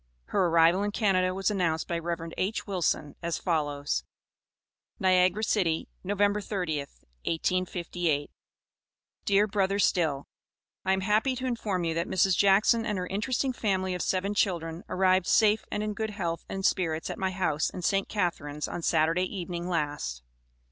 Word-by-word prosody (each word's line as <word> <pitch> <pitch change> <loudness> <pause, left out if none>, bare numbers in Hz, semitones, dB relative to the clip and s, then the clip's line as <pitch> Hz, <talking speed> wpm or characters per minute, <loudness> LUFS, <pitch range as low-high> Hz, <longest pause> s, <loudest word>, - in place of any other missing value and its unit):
Her 190 -3 +2
arrival 165 +3 +4
in 205 - 0
Canada 190 -4 +2
was 195 +2 0
announced 170 -5 0
by 170 -1 -1
Rev. 165 0 -4
H. 195 +4 -2
Wilson 175 -6 -1
as 170 -1 -2
follows: 145 -4 -1 1.0
NIAGARA 185 +1 +3
CITY, 180 -7 +1
Nov. 200 +2 -2
30th, 190 - -1 0.2
1858. 170 -3 -1 0.9
DEAR 200 +1 +4
BRO. 200 -2 0
STILL: 160 -8 +1 0.6
I 190 - +2
am 190 - 0
happy 215 +7 +2
to 255 +1 -4
inform 215 -7 -1
you 165 -1 0
that 170 +1 -1
Mrs. 190 0 +3
Jackson 200 +4 +4
and 210 -3 -2
her 180 - -2
interesting 250 +7 -1
family 190 -5 0
of 180 - -3
seven 195 +2 0
children 170 -4 -1
arrived 185 -1 +2
safe 215 0 +4
and 210 - -1
in 215 0 -2
good 220 +1 -3
health 175 -5 -3
and 195 0 -3
spirits 165 -4 0
at - - -7
my 190 - 0
house 180 -5 0
in 180 - -7
St. 195 +3 +1
Catharines, 155 -7 -2
on 175 - -5
Saturday 165 +3 +2
evening 175 -2 -5
last. 145 - -2
185 Hz, 155 wpm, -28 LUFS, 165-200 Hz, 1.0 s, arrival